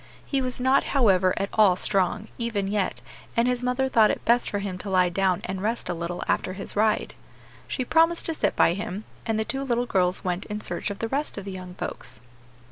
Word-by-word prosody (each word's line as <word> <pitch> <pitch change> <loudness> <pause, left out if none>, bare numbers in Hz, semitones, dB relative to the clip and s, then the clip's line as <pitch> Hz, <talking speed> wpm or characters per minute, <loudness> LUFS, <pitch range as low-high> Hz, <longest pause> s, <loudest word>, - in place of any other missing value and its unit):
He 275 -2 0
was 255 -1 +2
not, 260 +2 +3
however, 190 -7 +4
at 195 - -1
all 205 -4 +5
strong, 195 +3 0
even 225 -4 -1
yet, 200 -1 -1 0.4
and 235 +1 +4
his 250 -1 +1
mother 250 +1 0
thought 225 -4 +5
it - - -3
best 240 +1 +3
for 205 - -2
him 195 -2 -4
to 200 - -5
lie 185 -1 +3
down 185 0 +1
and 190 0 -4
rest 225 -1 -2
a - - 0
little 170 +1 -4
after 185 - 0
his 195 +1 -7
ride. 215 +1 +1 0.5
She 255 - -2
promised 330 +4 +3
to 325 - +1
sit - - 0
by 170 - +4
him, 205 +1 -5 0.2
and 225 -1 +1
the 220 - 0
two 270 +3 -3
little 245 -2 0
girls 185 -5 +1
went 180 +1 -2
in 210 0 -4
search 210 - -3
of 200 - -5
the 225 - -2
rest 285 0 -2
of 200 - -6
the 195 - -5
young 185 -1 -8
folks. 130 -7 -5
205 Hz, 225 wpm, -25 LUFS, 185-245 Hz, 0.5 s, all